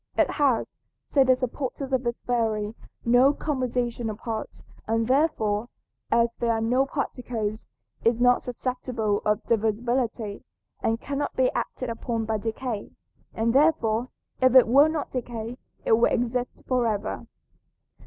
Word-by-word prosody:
It -, -, +3 dB
has 275 Hz, -6 st, +1 dB, 0.3 s
(say 275 Hz, -, +4 dB
the 260 Hz, 0 st, +5 dB
supporters 265 Hz, +1 st, -4 dB
of 260 Hz, -, +3 dB
this 235 Hz, -1 st, -2 dB
theory) 220 Hz, -3 st, 0 dB, 0.3 s
no 245 Hz, +4 st, +5 dB
composition 245 Hz, -5 st, -2 dB
of 210 Hz, -, -5 dB
parts, 225 Hz, -1 st, -5 dB, 0.2 s
and 225 Hz, +1 st, +1 dB
therefore, 240 Hz, -6 st, +1 dB, 0.4 s
as 235 Hz, 0 st, +3 dB
there 235 Hz, -1 st, +2 dB
are 225 Hz, -, 0 dB
no 250 Hz, +4 st, +2 dB
particles, 235 Hz, -6 st, -3 dB, 0.3 s
is 230 Hz, 0 st, +3 dB
not 245 Hz, 0 st, +4 dB
susceptible 245 Hz, -4 st, -2 dB
of 210 Hz, +1 st, +1 dB
divisibility 225 Hz, 0 st, -1 dB, 0.4 s
and 225 Hz, +1 st, 0 dB
cannot 285 Hz, +2 st, -3 dB
be 260 Hz, -1 st, +3 dB
acted 255 Hz, -2 st, -3 dB
upon 230 Hz, -1 st, -3 dB
by 220 Hz, -1 st, -1 dB
decay, 225 Hz, 0 st, -4 dB, 0.5 s
and 225 Hz, +1 st, +1 dB
therefore 255 Hz, -5 st, +3 dB, 0.3 s
if 255 Hz, 0 st, +4 dB
it 255 Hz, -3 st, +8 dB
will 280 Hz, +6 st, +6 dB
not 310 Hz, -2 st, -3 dB
decay 240 Hz, -1 st, -5 dB, 0.3 s
it -, -, 0 dB
will 225 Hz, +1 st, +5 dB
exist 245 Hz, +1 st, -1 dB
forever. 225 Hz, -5 st, -1 dB
240 Hz, 140 wpm, -26 LUFS, 225-255 Hz, 0.5 s, it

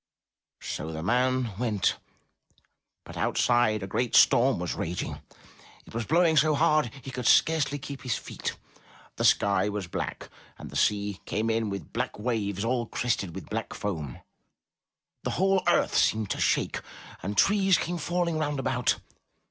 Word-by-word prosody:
So 80 Hz, -, -4 dB
the 80 Hz, 0 st, -5 dB
man 125 Hz, +3 st, +1 dB
went. 110 Hz, -6 st, +1 dB, 1.1 s
But -, -, -10 dB
outside, 115 Hz, -4 st, +2 dB
a -, -, -4 dB
great 120 Hz, +5 st, -1 dB
storm 130 Hz, +3 st, +5 dB
was 90 Hz, 0 st, -3 dB
raging; 85 Hz, +2 st, -4 dB, 0.6 s
it -, -, -15 dB
was 115 Hz, -2 st, -3 dB
blowing 165 Hz, -1 st, +3 dB
so 155 Hz, +2 st, +4 dB
hard, 155 Hz, -5 st, +3 dB
he 135 Hz, -, -7 dB
could 125 Hz, -2 st, -3 dB
scarcely 155 Hz, -3 st, +4 dB
keep 140 Hz, -1 st, -8 dB
his 125 Hz, -4 st, -1 dB
feet. -, -, -5 dB, 0.6 s
The -, -, -1 dB
sky 100 Hz, 0 st, +3 dB
was 105 Hz, -2 st, -3 dB
black, 85 Hz, -, -5 dB, 0.3 s
and -, -, -9 dB
the -, -, -10 dB
sea 100 Hz, -1 st, +1 dB
came 110 Hz, +1 st, -1 dB
in 110 Hz, -1 st, 0 dB
with 100 Hz, 0 st, -6 dB
black 125 Hz, +1 st, -2 dB
waves 105 Hz, -3 st, -2 dB
all 120 Hz, -1 st, 0 dB
crested 110 Hz, -9 st, -2 dB
with 95 Hz, -5 st, -7 dB
black -, -, -3 dB
foam. 80 Hz, -11 st, -4 dB, 1.0 s
The -, -, -3 dB
whole 190 Hz, 0 st, +3 dB
earth -, -, +3 dB
seemed 110 Hz, -2 st, +2 dB
to -, -, -2 dB
shake, -, -, +1 dB, 0.4 s
and 100 Hz, +2 st, -4 dB
trees 195 Hz, -3 st, +4 dB
came 175 Hz, 0 st, -3 dB
falling 170 Hz, 0 st, -1 dB
round 145 Hz, -2 st, -1 dB
about. 130 Hz, -2 st, +1 dB
120 Hz, 155 wpm, -27 LUFS, 100-145 Hz, 1.1 s, storm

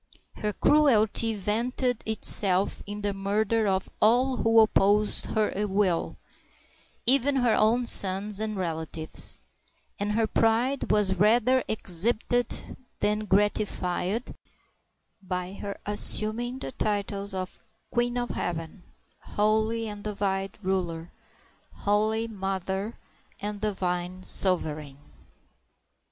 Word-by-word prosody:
Her 210 Hz, -, -2 dB
cruelty 230 Hz, -5 st, +3 dB
vented 235 Hz, +4 st, -1 dB
itself 200 Hz, -3 st, +1 dB
in 205 Hz, +1 st, -6 dB
the 205 Hz, -1 st, -1 dB
murder 210 Hz, +3 st, 0 dB
of 190 Hz, -1 st, -1 dB
all 250 Hz, +4 st, +3 dB
who 225 Hz, 0 st, +3 dB
opposed 210 Hz, -1 st, +3 dB
her 215 Hz, -1 st, -1 dB
will, 190 Hz, -3 st, -1 dB, 0.9 s
even 275 Hz, +2 st, +3 dB
to 265 Hz, -, +1 dB
her 240 Hz, -2 st, +2 dB
own 235 Hz, +3 st, +2 dB
sons 200 Hz, -1 st, +6 dB
and 215 Hz, -1 st, -3 dB
relatives; 160 Hz, -2 st, -4 dB, 0.6 s
and 205 Hz, +1 st, -2 dB
her 225 Hz, +1 st, +1 dB
pride 230 Hz, +5 st, 0 dB
was 195 Hz, -3 st, +1 dB
rather 240 Hz, +6 st, +3 dB
exhibited 220 Hz, +5 st, -1 dB, 0.2 s
than 210 Hz, +1 st, 0 dB
gratified 205 Hz, +1 st, -1 dB, 0.9 s
by 180 Hz, -1 st, -4 dB
her 200 Hz, 0 st, -7 dB
assum 215 Hz, +2 st, +3 dB
ing 245 Hz, +1 st, -4 dB
the 135 Hz, -, -7 dB
titles 200 Hz, 0 st, -3 dB
of 185 Hz, -1 st, -6 dB, 0.3 s
Queen 240 Hz, 0 st, 0 dB
of 240 Hz, 0 st, -2 dB
Heaven, 165 Hz, +2 st, -5 dB, 0.4 s
Holy 220 Hz, +2 st, 0 dB
and 205 Hz, -1 st, -8 dB
Divine 195 Hz, -2 st, -2 dB
Ruler, 175 Hz, -3 st, -3 dB, 0.6 s
Holy 215 Hz, +2 st, 0 dB
Mother, 195 Hz, 0 st, -4 dB, 0.4 s
and 205 Hz, 0 st, -5 dB
Divine 185 Hz, -3 st, -3 dB
Sovereign. 155 Hz, -8 st, +2 dB
210 Hz, 110 wpm, -26 LUFS, 190-225 Hz, 0.9 s, sons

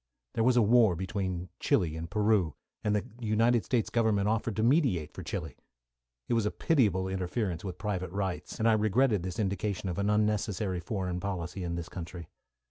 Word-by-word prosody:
There 115 Hz, -, +1 dB
was 125 Hz, +1 st, +4 dB
a 120 Hz, -, +6 dB
war 110 Hz, -3 st, +5 dB
between 95 Hz, -1 st, -3 dB
Chili 80 Hz, -3 st, +1 dB
and 80 Hz, +1 st, -5 dB
Peru, 105 Hz, -6 st, +2 dB, 0.3 s
and 105 Hz, -1 st, +1 dB
the 105 Hz, -, 0 dB
United 115 Hz, +1 st, +2 dB
States 120 Hz, -4 st, 0 dB
Government 110 Hz, -4 st, +2 dB
offered 110 Hz, 0 st, 0 dB
to 110 Hz, -, 0 dB
mediate 115 Hz, -, +2 dB
for -, -, -7 dB
Chili. -, -, -5 dB, 0.7 s
It -, -, 0 dB
was 115 Hz, -3 st, +2 dB
a -, -, +2 dB
pitiable 105 Hz, -, +2 dB
interference 95 Hz, -1 st, -2 dB
with 90 Hz, -3 st, -5 dB
private 95 Hz, -2 st, -2 dB
rights, 95 Hz, -1 st, -3 dB
and 115 Hz, -, +1 dB
I 115 Hz, -, +6 dB
regretted 110 Hz, 0 st, +3 dB
this 90 Hz, 0 st, -5 dB
indication 100 Hz, -2 st, -1 dB
of 85 Hz, -, -3 dB
an 100 Hz, +1 st, +1 dB
unnecessary 105 Hz, -3 st, +1 dB
foreign 90 Hz, -1 st, -3 dB
policy 90 Hz, -1 st, -4 dB
in 85 Hz, -1 st, -2 dB
this 85 Hz, -1 st, -4 dB
country. 85 Hz, -2 st, -8 dB
100 Hz, 185 wpm, -30 LUFS, 90-110 Hz, 0.7 s, a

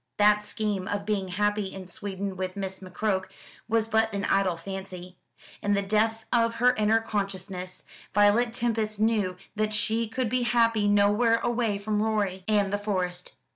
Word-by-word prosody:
That 210 Hz, 0 st, +5 dB
scheme 210 Hz, -3 st, -2 dB
of 200 Hz, -1 st, -2 dB
being 205 Hz, -3 st, -1 dB
happy 205 Hz, +1 st, 0 dB
in 190 Hz, -1 st, -8 dB
Sweden 195 Hz, +1 st, -5 dB
with 185 Hz, 0 st, -4 dB
Miss 190 Hz, -1 st, -4 dB
McCroke 190 Hz, +1 st, -2 dB, 0.4 s
was 225 Hz, -1 st, +1 dB
but 220 Hz, 0 st, +2 dB
an 200 Hz, 0 st, -2 dB
idle 185 Hz, -3 st, +2 dB
fancy. 185 Hz, 0 st, -7 dB, 0.5 s
In 205 Hz, 0 st, +1 dB
the 200 Hz, -, 0 dB
depths 220 Hz, +2 st, +1 dB
of 230 Hz, -1 st, +3 dB
her 250 Hz, +2 st, +4 dB
inner 215 Hz, +1 st, +3 dB
consciousness 190 Hz, -4 st, -4 dB, 0.3 s
Violet 205 Hz, +4 st, +4 dB
Tempest 225 Hz, -3 st, -1 dB
knew 210 Hz, -4 st, +1 dB, 0.2 s
that 215 Hz, 0 st, 0 dB
she 225 Hz, +2 st, 0 dB
could 250 Hz, +3 st, -2 dB
be 250 Hz, +3 st, 0 dB
happy 230 Hz, -3 st, +2 dB
nowhere 205 Hz, +3 st, +4 dB
away 235 Hz, -4 st, 0 dB
from 210 Hz, +1 st, -1 dB
Rorie 205 Hz, -4 st, 0 dB
and 205 Hz, -2 st, +2 dB
the 205 Hz, -, +1 dB
Forest. 180 Hz, -4 st, -3 dB
205 Hz, 165 wpm, -27 LUFS, 195-220 Hz, 0.5 s, That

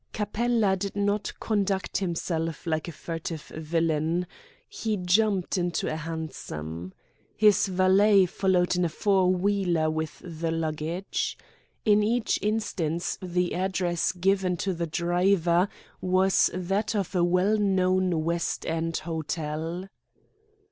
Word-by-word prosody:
Capella 215 Hz, -1 st, +1 dB
did 195 Hz, +1 st, -4 dB
not 205 Hz, 0 st, 0 dB
conduct 200 Hz, -4 st, 0 dB
himself 165 Hz, -3 st, -2 dB
like 160 Hz, -1 st, -1 dB
a -, -, -4 dB
furtive 165 Hz, 0 st, -5 dB
villain. 160 Hz, +1 st, 0 dB, 0.4 s
He 220 Hz, -2 st, -2 dB
jumped 190 Hz, 0 st, +1 dB
into 175 Hz, -3 st, -1 dB
a -, -, -2 dB
hansom. 95 Hz, -, -6 dB, 0.4 s
His 210 Hz, -2 st, +4 dB
valet 190 Hz, +2 st, +5 dB
followed 180 Hz, 0 st, +1 dB
in 180 Hz, -, +1 dB
a 170 Hz, -, +1 dB
four 190 Hz, +2 st, +2 dB
wheeler 180 Hz, -4 st, +1 dB
with 160 Hz, -1 st, -4 dB
the 165 Hz, -1 st, -3 dB
luggage. 160 Hz, +3 st, -2 dB, 0.5 s
In 210 Hz, -1 st, +5 dB
each 225 Hz, +2 st, +1 dB
instance 185 Hz, -6 st, -1 dB
the 180 Hz, -1 st, -1 dB
address 180 Hz, -2 st, 0 dB
given 185 Hz, 0 st, +1 dB
to 190 Hz, +2 st, -1 dB
the 170 Hz, -1 st, -3 dB
driver 175 Hz, +2 st, +2 dB, 0.3 s
was 185 Hz, +1 st, +3 dB
that 195 Hz, +5 st, -1 dB
of 200 Hz, -2 st, -1 dB
a 180 Hz, -2 st, +2 dB
well 180 Hz, +5 st, +3 dB
known 185 Hz, -4 st, +2 dB
West 170 Hz, +1 st, -1 dB
End 165 Hz, 0 st, -1 dB
hotel. 160 Hz, +2 st, -4 dB
180 Hz, 120 wpm, -27 LUFS, 165-195 Hz, 0.5 s, valet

